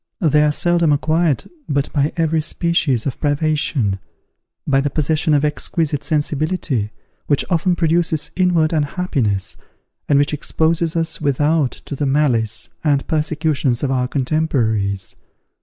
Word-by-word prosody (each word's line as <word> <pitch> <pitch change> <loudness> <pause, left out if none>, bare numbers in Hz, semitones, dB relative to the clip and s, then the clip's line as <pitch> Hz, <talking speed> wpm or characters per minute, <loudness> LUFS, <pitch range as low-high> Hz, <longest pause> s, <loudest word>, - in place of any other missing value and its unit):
They 150 -4 +3
are 150 0 +3
seldom 170 0 +2
acquired 155 +1 +1 0.2
but 140 -1 -1
by 145 0 +1
every 160 -1 +1
species 155 -6 0
of 135 - -3
privation, 145 -8 0 0.7
by 135 -1 +2
the 145 - 0
possession 155 +2 +1
of 145 +1 +2
exquisite 150 0 -1
sensibility, 150 - -1 0.4
which 145 - +2
often 175 +1 +2
produces 165 -2 +1
inward 170 -4 +2
unhappiness, 145 - -1 0.5
and 145 - +4
which 145 +1 +2
exposes 160 +2 0
us 165 -1 -1
without 145 0 +2 0.2
to 140 - -5
the 140 +1 -1
malice 120 -6 +1
and 145 -3 +1
persecutions 150 -5 0
of 135 - 0
our 125 -1 0
contemporaries. 120 -9 -1
150 Hz, 130 wpm, -19 LUFS, 135-160 Hz, 0.7 s, and